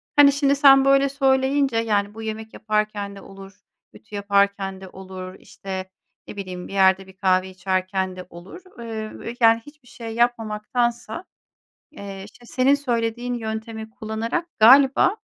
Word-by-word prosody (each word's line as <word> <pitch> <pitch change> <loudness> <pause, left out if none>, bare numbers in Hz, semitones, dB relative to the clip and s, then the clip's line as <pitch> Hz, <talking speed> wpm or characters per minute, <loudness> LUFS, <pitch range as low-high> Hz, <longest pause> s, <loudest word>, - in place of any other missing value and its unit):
Hani, 285 -1 +7
şimdi 280 0 +2
sen 270 -1 +6
böyle 275 0 +4
söyleyince, 270 -1 +1
yani, 210 -3 0
bu 225 - -9
yemek 220 0 -6
yaparken 210 -2 -2
de 195 - -11
olur, 195 0 -13 0.4
ütü 210 -1 -13
yaparken 200 -1 0
de 190 - -10
olur, 185 -1 -9
işte, 190 -1 -7 0.4
ne - - -9
bileyim, 185 -2 -6
bir - - -10
yerde 190 0 +3
bir 190 0 -17
kahve 185 -1 +1
içerken 185 0 -2
de 185 -1 -9
olur. 175 - -12 0.2
Eee, 225 +1 -6
yani, 225 0 +6
hiçbir 290 -3 -17
şey 230 -1 -8
yapmamaktansa, 235 - -1 0.7
eee, 195 -6 -9
işte, 240 +4 -17
senin 260 +3 +2
söylediğin 240 -3 -2
yöntemi 220 -1 -5
kullanarak 230 +7 -3
galiba 270 - +6
220 Hz, 145 wpm, -22 LUFS, 195-245 Hz, 0.7 s, Hani